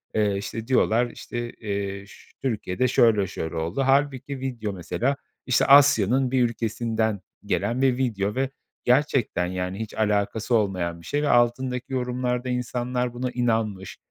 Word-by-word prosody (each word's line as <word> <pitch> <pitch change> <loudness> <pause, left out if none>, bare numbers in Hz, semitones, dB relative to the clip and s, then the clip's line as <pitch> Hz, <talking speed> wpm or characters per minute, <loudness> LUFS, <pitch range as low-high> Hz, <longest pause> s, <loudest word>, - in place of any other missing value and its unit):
Eee, 105 -2 +2
işte, 110 +3 -5
diyorlar 120 -2 +3
işte, 120 0 -6
eee, 100 -2 -4
ş - - -17
Türkiye'de 110 -1 -1
şöyle 110 -5 +4
şöyle 80 -1 -5
oldu. 85 +9 -2
Hâlbuki 135 0 +1
video 120 -6 -4
mesela, 120 +9 -1 0.3
işte, 130 - +3
Asya'nın 135 -3 +5
bir 130 -1 +3
ülkesinden 110 -2 -1 0.3
gelen 115 +6 0
bir 130 -2 +3
video 105 -6 -1
ve 135 0 0 0.3
gerçekten, 125 -8 +2
yani, 90 +2 -3
hiç 110 -1 -5
alakası 105 +2 0
olmayan 90 -6 -1
bir - - -16
şey 145 - -1
ve 150 - 0
altındaki 125 +2 +1
yorumlarda 125 0 -1
insanlar 125 0 -2
buna 125 +1 -3
inanmış, 110 -7 -1
120 Hz, 145 wpm, -25 LUFS, 100-130 Hz, 0.3 s, Asya'nın